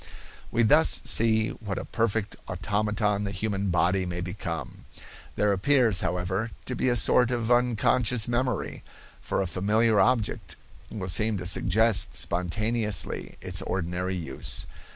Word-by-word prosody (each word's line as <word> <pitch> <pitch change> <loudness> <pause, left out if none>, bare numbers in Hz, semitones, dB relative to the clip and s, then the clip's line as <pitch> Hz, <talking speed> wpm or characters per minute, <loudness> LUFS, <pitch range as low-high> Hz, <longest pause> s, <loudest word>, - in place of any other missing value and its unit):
We 115 - +2
thus 150 +8 +5
see 110 -1 +3
what 100 -4 -6
a - - -5
perfect 110 -2 -1
automaton 105 +2 -1
the 100 - -3
human 100 0 -2
body 90 +2 +2
may 90 0 -4
become. 85 - -6 0.5
There 105 -1 +2
appears, 115 -1 +3
however, 90 +5 -2 0.2
to 125 - -2
be 130 - 0
a 120 - +1
sort 120 +1 +4
of 120 -1 -2
unconscious 120 -1 +2
memory, 120 +1 -2 0.4
for - - -1
a - - -4
familiar 105 +5 +1
object 110 -5 0 0.4
will 100 -4 -5
seem 105 +3 +1
to 90 - -6
suggest 110 +2 +2
spontaneously 105 +4 -2
its 90 +1 -2
ordinary 90 0 -3
use. 85 -3 -3
105 Hz, 135 wpm, -26 LUFS, 90-115 Hz, 0.5 s, thus